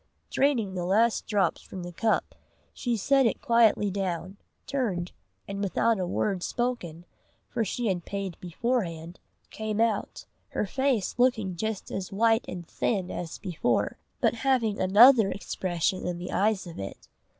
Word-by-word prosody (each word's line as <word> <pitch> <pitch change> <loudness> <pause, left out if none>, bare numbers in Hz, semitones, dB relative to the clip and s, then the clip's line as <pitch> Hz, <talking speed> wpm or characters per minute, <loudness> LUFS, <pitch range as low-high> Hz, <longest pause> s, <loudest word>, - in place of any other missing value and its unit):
Draining 245 -9 +1
the 180 -2 -3
last 215 +6 +2
drops 205 -3 +1
from 185 -2 -8
the 175 - -6
cup, 220 +5 0 0.4
she 240 -2 -1
set 270 +5 +4
it - - -1
quietly 225 -3 +3
down, 190 0 -3 0.3
turned, 200 -11 -2 0.4
and 200 0 -4
without 210 +2 +1
a 180 - -1
word 190 +1 -1
spoken, 175 -9 -3 0.4
for 235 -2 0
she 235 +4 -3
had 185 -5 0
paid 195 -2 -4
beforehand, 175 -4 -2 0.3
came 215 -1 -3
out, 225 -3 0 0.2
her - - -1
face 255 0 0
looking 220 -7 +2
just 220 +2 -3
as 190 -1 -4
white 225 +3 +3
and 175 -2 -7
thin 190 -5 -1
as 170 -2 -5
before, 125 - -1 0.2
but - - +3
having 235 -3 +1
another 215 +3 +7
expression 185 -2 -2
in 175 -1 -2
the 180 +1 -6
eyes 205 -1 +1
of 170 -2 -9
it. 95 0 -7
200 Hz, 150 wpm, -27 LUFS, 180-230 Hz, 0.4 s, another